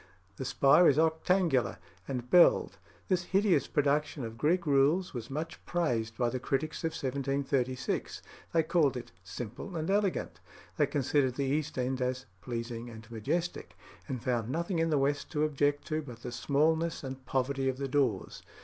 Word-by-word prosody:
The 130 Hz, -, -4 dB
spire 140 Hz, +6 st, +5 dB
is 140 Hz, -, +2 dB
octangular 160 Hz, -, +2 dB, 0.3 s
and 125 Hz, -2 st, -4 dB
belled. 175 Hz, +6 st, +5 dB, 0.3 s
This 180 Hz, -2 st, +1 dB
hideous 195 Hz, 0 st, +2 dB
production 145 Hz, -2 st, 0 dB
of 115 Hz, 0 st, -7 dB
Greek 170 Hz, +8 st, +1 dB
rules 150 Hz, +6 st, +3 dB
was 120 Hz, -2 st, -6 dB
much 155 Hz, +4 st, -5 dB
praised 115 Hz, -10 st, -1 dB
by 120 Hz, -2 st, +2 dB
the 130 Hz, -, -3 dB
critics 145 Hz, +5 st, -2 dB
of 165 Hz, 0 st, -1 dB
1736. 135 Hz, -1 st, -2 dB, 0.3 s
They 165 Hz, -1 st, +3 dB
called 155 Hz, -5 st, +2 dB
it 120 Hz, -, -8 dB
"simple 115 Hz, -, -7 dB
and 160 Hz, +3 st, -1 dB
elegant." 200 Hz, -2 st, 0 dB, 0.4 s
They -, -, +3 dB
considered 135 Hz, -2 st, +1 dB
the 140 Hz, -, -1 dB
east 150 Hz, +2 st, -1 dB
end 130 Hz, +1 st, -1 dB
as 130 Hz, +1 st, -1 dB, 0.2 s
"pleasing 120 Hz, -1 st, -5 dB
and 115 Hz, 0 st, -12 dB
majestic," 165 Hz, +11 st, -3 dB, 0.3 s
and 130 Hz, -5 st, -4 dB
found 120 Hz, -3 st, 0 dB
nothing 170 Hz, +4 st, -1 dB
in 165 Hz, 0 st, +2 dB
the 150 Hz, -, +2 dB
west 140 Hz, +1 st, 0 dB
to 150 Hz, -1 st, +1 dB
object 145 Hz, -1 st, +1 dB
to 155 Hz, 0 st, 0 dB
but 120 Hz, -5 st, -11 dB
the 125 Hz, -, -5 dB
smallness 155 Hz, +6 st, +1 dB
and 130 Hz, 0 st, -6 dB
poverty 135 Hz, +1 st, 0 dB
of 130 Hz, -, -3 dB
the 140 Hz, 0 st, -2 dB
doors. 130 Hz, -7 st, 0 dB
140 Hz, 165 wpm, -30 LUFS, 125-160 Hz, 0.4 s, spire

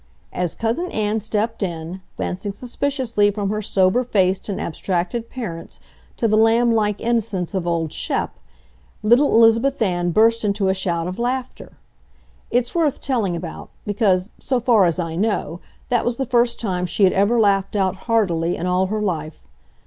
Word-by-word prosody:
As 180 Hz, -2 st, -2 dB
Cousin 235 Hz, +11 st, -1 dB
Ann 215 Hz, 0 st, 0 dB
stepped 220 Hz, +2 st, -2 dB
in, 175 Hz, 0 st, -4 dB, 0.2 s
glancing 195 Hz, +2 st, -3 dB
suspiciously 245 Hz, -2 st, 0 dB
from 205 Hz, -1 st, -2 dB
her 215 Hz, 0 st, -2 dB
sober 195 Hz, +3 st, +2 dB
faced 190 Hz, -4 st, +1 dB
and 200 Hz, -, -3 dB
abstracted 185 Hz, +7 st, -2 dB
parents 170 Hz, -10 st, -7 dB, 0.4 s
to 230 Hz, -, +1 dB
the 215 Hz, -, +2 dB
lamb 230 Hz, +2 st, +4 dB
like 210 Hz, -2 st, +1 dB
innocence 220 Hz, -6 st, -1 dB
of 185 Hz, -3 st, -2 dB
old 165 Hz, -2 st, -1 dB
Shep, -, -, -2 dB, 0.7 s
little 240 Hz, +7 st, +4 dB
Elizabeth 230 Hz, +4 st, +4 dB
Ann 175 Hz, -5 st, 0 dB
burst 225 Hz, +5 st, +3 dB
into 200 Hz, -2 st, +1 dB
a -, -, +3 dB
shout 175 Hz, -3 st, -1 dB
of 185 Hz, +4 st, -5 dB
laughter. 250 Hz, +1 st, -3 dB, 0.8 s
It's 245 Hz, 0 st, 0 dB
worth 320 Hz, -5 st, +1 dB
telling 225 Hz, -10 st, -1 dB
about, 170 Hz, -1 st, -7 dB, 0.2 s
because, 200 Hz, -2 st, +1 dB
so 260 Hz, -2 st, 0 dB
far 230 Hz, -5 st, +4 dB
as 170 Hz, -2 st, +1 dB
I 165 Hz, -2 st, -3 dB
know, 195 Hz, -4 st, -1 dB, 0.3 s
that 240 Hz, -2 st, +2 dB
was 240 Hz, -1 st, -1 dB
the 270 Hz, -, -1 dB
first 240 Hz, -1 st, +1 dB
time 180 Hz, -5 st, -2 dB
she 200 Hz, -, 0 dB
had 185 Hz, -, +5 dB
ever 205 Hz, +5 st, +3 dB
laughed 200 Hz, -2 st, +2 dB
out 190 Hz, -2 st, +1 dB
heartily 175 Hz, -7 st, +1 dB
in 175 Hz, -, -3 dB
all 180 Hz, +1 st, +1 dB
her 210 Hz, +2 st, -2 dB
life. 155 Hz, -, -4 dB
210 Hz, 170 wpm, -21 LUFS, 185-230 Hz, 0.8 s, had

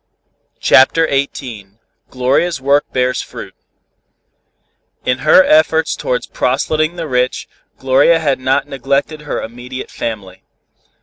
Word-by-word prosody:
CHAPTER 160 Hz, +5 st, +4 dB
XVIII 120 Hz, -8 st, -4 dB, 0.3 s
GLORIA'S 135 Hz, +6 st, 0 dB
WORK 140 Hz, +2 st, +1 dB
BEARS 125 Hz, 0 st, 0 dB
FRUIT -, -, -10 dB, 1.5 s
In 125 Hz, +1 st, 0 dB
her 155 Hz, +5 st, +6 dB
efforts 160 Hz, 0 st, +2 dB
towards -, -, -2 dB
proselyting 155 Hz, +2 st, -1 dB
the 165 Hz, -2 st, -5 dB
rich, 125 Hz, -2 st, -1 dB, 0.3 s
Gloria 135 Hz, +5 st, +3 dB
had 145 Hz, -5 st, 0 dB
not 130 Hz, +2 st, 0 dB
neglected 140 Hz, +3 st, -2 dB
her 150 Hz, -, -4 dB
immediate 125 Hz, +3 st, -8 dB
family. 95 Hz, -5 st, -6 dB
135 Hz, 110 wpm, -16 LUFS, 125-155 Hz, 1.5 s, her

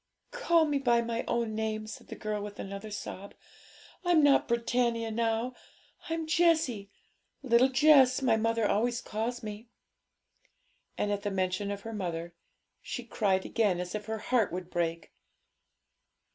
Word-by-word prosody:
'Call 340 Hz, -10 st, +3 dB
me 290 Hz, -2 st, 0 dB
by 240 Hz, -3 st, +3 dB
my 235 Hz, 0 st, -2 dB
own 230 Hz, -2 st, -1 dB
name,' 215 Hz, 0 st, -2 dB
said 215 Hz, -, -10 dB
the -, -, -7 dB
girl, 215 Hz, -1 st, -3 dB
with 205 Hz, 0 st, -7 dB
another 200 Hz, +2 st, -6 dB
sob. 200 Hz, -1 st, -7 dB, 0.7 s
'I'm 350 Hz, -4 st, +4 dB
not 285 Hz, -1 st, +5 dB
Britannia 235 Hz, -1 st, 0 dB
now, 230 Hz, +2 st, 0 dB, 0.6 s
I'm 325 Hz, 0 st, -2 dB
Jessie; 315 Hz, -, +2 dB, 0.5 s
"Little 250 Hz, 0 st, +4 dB
Jess," 265 Hz, -2 st, +5 dB
my 255 Hz, -5 st, +3 dB
mother 230 Hz, 0 st, +1 dB
always 235 Hz, +3 st, +1 dB
calls 230 Hz, +2 st, -4 dB
me.' 215 Hz, +2 st, -7 dB, 1.3 s
And 205 Hz, -, 0 dB
at 205 Hz, -1 st, -1 dB
the 205 Hz, -, -2 dB
mention 190 Hz, +1 st, -1 dB
of 200 Hz, 0 st, -4 dB
her 225 Hz, +2 st, -7 dB
mother 170 Hz, -4 st, -4 dB, 0.5 s
she 245 Hz, -, -5 dB
cried 195 Hz, -5 st, 0 dB
again 205 Hz, -6 st, +1 dB
as 180 Hz, 0 st, -4 dB
if 210 Hz, 0 st, -5 dB
her 220 Hz, 0 st, -2 dB
heart 225 Hz, -1 st, +1 dB
would 180 Hz, 0 st, -6 dB
break. 165 Hz, -1 st, -2 dB
225 Hz, 150 wpm, -30 LUFS, 205-250 Hz, 1.3 s, not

